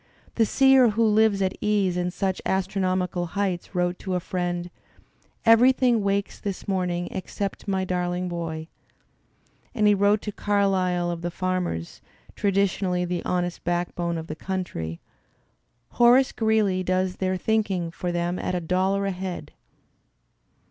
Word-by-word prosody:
The 225 -2 +2
seer 265 -1 +5
who 215 0 +2
Kves 215 -3 +3
at 185 - -2
ease 205 -4 +1
in 180 0 0
such 190 +1 -2
astronomical 185 -2 -1
heights 190 -2 -2
wrote 180 0 0
to 190 -2 -3
a - - +1
friend: 175 -1 -3 0.7
"Everything 240 0 +5
wakes 200 0 -1
this 200 -2 -5
morning 180 -2 -1
except 195 +2 -5
my 190 -1 0
darling 180 0 -1
boy." 165 -2 -4 1.1
And 215 -3 +2
he 210 - +6
wrote 205 +1 +2
to 210 - -3
Carlyle 190 -4 +1
of 170 -1 -5
the 175 - -2
farmers, 180 - -3 0.3
traditionally 190 -2 +1
the 175 -1 -3
honest 175 -1 -2
backbone 175 -1 -1
of 160 - -5
the 155 - -6
country: 155 - -4 0.9
"Horace 245 +2 +5
Greeley 215 -4 +1
does 185 0 0
their 185 0 0
thinking 195 -5 0
for 175 +1 -3
them 175 +1 -1
at 180 - -2
a - - 0
dollar 185 +3 0
a 195 - 0
head." 185 -1 -6
185 Hz, 140 wpm, -25 LUFS, 175-200 Hz, 1.1 s, he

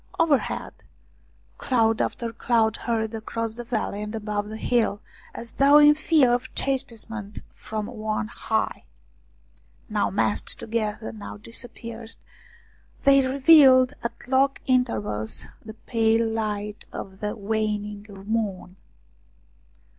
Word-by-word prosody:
Overhead, 290 -5 +1 0.9
cloud 225 -3 +2
after 230 -1 -2
cloud 225 -2 +2
hurried 225 -2 -2
across 225 0 -3
the 240 +1 -7
valley 220 -3 -2
and 210 +1 -5
above 210 -1 -3
the 220 - -6
hill, 220 -3 +1 0.4
as 230 - -4
though 280 +2 +6
in 295 0 +8
fear 300 -4 +3
of 245 - -2
chastisement 230 -6 -3 0.2
from 215 -1 -5
on 215 -2 -3
high; 220 -1 -2 1.0
now 210 -1 +1
massed 205 +1 -1
together, 215 - -3
now 100 -1 -8
dispersed, 225 - -9 0.9
they 275 -1 +6
revealed 265 -2 +6
at 235 - -6
long 270 +1 +3
intervals 230 - 0 0.2
the 220 0 -9
pale 225 0 +1
light 210 -2 -3
of 190 0 -8
the 210 +1 -3
waning 210 -1 -2 0.2
moon. 200 -4 -2
225 Hz, 115 wpm, -25 LUFS, 210-245 Hz, 1.0 s, in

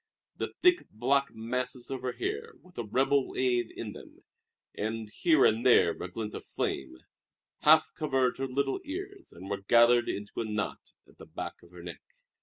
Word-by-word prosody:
The - - -4
thick 360 -1 +4
black 140 +5 +1
masses 125 +3 -4
of 130 -2 -3
her 125 -1 -2
hair, 445 +3 -4
with 180 -1 -20
a - - -1
rebel 135 +5 +2
wave 120 -2 0
in 105 -3 -5
them, - - -14 0.5
and 110 +1 -3
here 155 0 +4
and 110 +2 +3
there 120 -9 +6
a 90 - -6
glint 110 +1 -5
of - - -6
flame, 65 - -3 0.6
half 155 +1 +5
covered 135 -6 0
her 135 - -1
little 135 +1 -1
ears 385 +4 -7
and 95 - -11
were 100 -1 -3
gathered 120 +3 +5
into 105 +3 -4
a - - -2
knot 105 -1 -4
at - - -23
the - - -11
back - - -7
of 85 - -18
her 90 -1 -12
neck. 85 -5 -8
125 Hz, 185 wpm, -30 LUFS, 110-140 Hz, 0.6 s, there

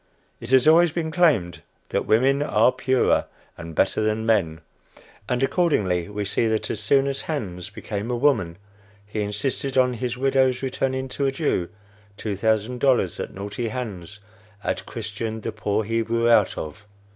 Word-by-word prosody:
It - - -8
has 130 +1 +5
always 165 +1 +6
been 160 0 -3
claimed 145 - +2 0.3
that - - -1
women 135 +5 +3
are 125 -4 +3
purer 130 0 +1 0.3
and 80 -2 -9
better 95 - +2
than 110 +1 0
men; 85 -8 +1 0.7
and 125 +1 0
accordingly 105 - +1
we 105 0 -3
see 115 +4 +1
that 110 0 -1
as 105 - -3
soon 135 +6 +3
as 140 0 -2
Hans 95 - -4
became 105 +3 -5
a 125 - 0
woman 115 -11 +1 0.5
he 105 +1 -4
insisted 130 +6 -2
on 125 -1 +4
his 120 +1 -3
widow's 130 -1 +2
returning 130 0 -1
to 140 +2 -1
a - - +1
Jew 135 - -1 0.5
two 105 -2 -3
thousand 110 +4 0
dollars 125 -10 +2
that - - -5
naughty 105 +4 -4
Hans 105 -6 -6 0.4
had - - -3
"Christianed" 110 0 -5
the 115 - -2
poor 105 0 -1
Hebrew 115 +1 0
out 115 - +4
of. 100 +7 -7
115 Hz, 165 wpm, -23 LUFS, 105-130 Hz, 0.7 s, always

